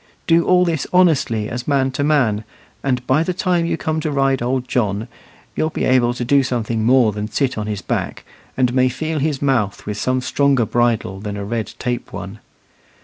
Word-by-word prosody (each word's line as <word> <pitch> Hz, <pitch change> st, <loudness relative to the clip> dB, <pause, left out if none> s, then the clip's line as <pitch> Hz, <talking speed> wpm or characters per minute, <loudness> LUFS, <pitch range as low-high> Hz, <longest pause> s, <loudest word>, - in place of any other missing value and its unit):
Do 165 Hz, 0 st, +3 dB
all 180 Hz, 0 st, +4 dB
this 160 Hz, -5 st, -1 dB
honestly 150 Hz, -12 st, +2 dB
as 120 Hz, +1 st, -5 dB
man 135 Hz, -2 st, +2 dB
to 140 Hz, +2 st, -2 dB
man, 125 Hz, -8 st, +2 dB, 0.4 s
and 125 Hz, -2 st, -1 dB
by 135 Hz, +4 st, +3 dB
the 175 Hz, +2 st, -1 dB
time 175 Hz, -2 st, +1 dB
you -, -, -1 dB
come 160 Hz, 0 st, -2 dB
to 155 Hz, 0 st, -2 dB
ride 135 Hz, -2 st, +1 dB
old 125 Hz, +1 st, -1 dB
John, 105 Hz, -2 st, -1 dB, 0.5 s
you'll 155 Hz, -, 0 dB
be -, -, -4 dB
able 120 Hz, -2 st, +3 dB
to 125 Hz, -, -3 dB
do 140 Hz, +3 st, +4 dB
something 115 Hz, -3 st, -2 dB
more 120 Hz, -1 st, +4 dB
than 105 Hz, +1 st, -4 dB
sit 130 Hz, 0 st, 0 dB
on 105 Hz, -1 st, -4 dB
his 105 Hz, -3 st, -4 dB
back, -, -, -3 dB, 0.3 s
and 125 Hz, -2 st, +2 dB
may 130 Hz, 0 st, +3 dB
feel 155 Hz, +5 st, -3 dB
his 145 Hz, -1 st, -1 dB
mouth 120 Hz, -8 st, 0 dB
with 105 Hz, -1 st, -4 dB
some 130 Hz, 0 st, 0 dB
stronger 135 Hz, -1 st, +2 dB
bridle 115 Hz, -5 st, 0 dB
than 105 Hz, 0 st, -5 dB
a 100 Hz, -, -4 dB
red 115 Hz, +1 st, -3 dB
tape 125 Hz, -1 st, -3 dB
one. 100 Hz, +2 st, -7 dB
130 Hz, 200 wpm, -19 LUFS, 110-145 Hz, 0.5 s, all